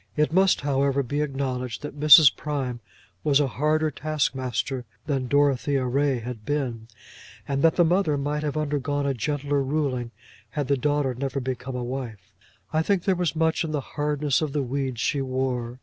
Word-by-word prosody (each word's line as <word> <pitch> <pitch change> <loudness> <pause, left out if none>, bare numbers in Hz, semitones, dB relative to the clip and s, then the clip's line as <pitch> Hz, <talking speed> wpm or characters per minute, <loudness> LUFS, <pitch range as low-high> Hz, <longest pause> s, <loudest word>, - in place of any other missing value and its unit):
It 150 +1 +1
must, 190 +1 +4
however, 140 0 +1
be 145 +4 -2
acknowledged 130 -4 -3
that 145 0 -7
Mrs. 150 -1 +8
Prime 135 -5 -3 0.4
was 145 -2 +4
a 145 - +3
harder 155 +3 0
taskmaster 130 -4 -2 0.2
than 135 -4 -1
Dorothea 140 -1 +2
Ray 135 +1 +1
had 115 -1 -7
been, 125 -5 -3 0.6
and 140 -1 -1
that 165 +1 +4
the 175 - +4
mother 170 -3 +2
might 145 +2 -2
have 150 0 -2
undergone 145 -1 -1
a 140 - +1
gentler 145 +2 -1
ruling 135 -4 -1 0.4
had 140 +4 -3
the 140 - +4
daughter 145 0 0
never 135 +2 -3
become 130 0 -4
a 125 - -3
wife. 115 -6 -6 0.4
I 155 - +3
think 185 +1 +1
there 195 - +2
was 175 -4 -1
much 160 +1 +1
in 155 -2 -4
the 150 - 0
hardness 150 -1 0
of 150 -3 -2
the 145 -2 0
weeds 130 -1 -3
she 140 +4 0
wore. 130 -2 -2
140 Hz, 180 wpm, -25 LUFS, 130-150 Hz, 0.6 s, Mrs